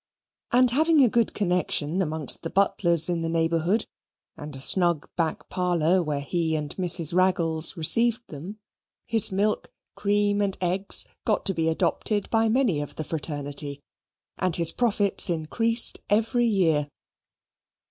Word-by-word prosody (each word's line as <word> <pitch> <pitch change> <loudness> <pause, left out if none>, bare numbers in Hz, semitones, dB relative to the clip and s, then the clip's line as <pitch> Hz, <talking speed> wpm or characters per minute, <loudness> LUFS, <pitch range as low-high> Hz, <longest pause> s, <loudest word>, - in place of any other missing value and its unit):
And 250 0 +3
having 310 +2 +3
a - - +5
good 230 0 0
connection 180 -3 -1
amongst 155 -5 -1
the 165 - -5
butlers 170 -3 +3
in 175 -2 -1
the 165 - -3
neighbourhood, 165 +5 0 0.5
and 150 -1 -9
a - - -8
snug 170 +1 +2
back 165 -2 -3
parlour 180 0 0
where 150 -4 -3
he 160 +2 -2
and 150 -1 -4
Mrs. 175 -3 +1
Raggles 170 -2 +1
received 230 +9 +2
them, 170 +8 -9 0.5
his 225 -3 +3
milk, 205 +3 -2 0.2
cream, 205 0 0
and 200 -2 -2
eggs 185 +2 +3 0.2
got 215 - -1
to 195 - 0
be 160 -2 -1
adopted 190 +5 -1
by 225 0 +2
many 220 - 0
of 145 - -8
the 155 - -5
fraternity, 145 -2 -4 0.6
and 185 -3 0
his 170 -1 +2
profits 205 -5 +1
increased 225 +9 +2
every 225 +3 +1
year. 165 -9 +1
180 Hz, 145 wpm, -24 LUFS, 160-205 Hz, 0.6 s, a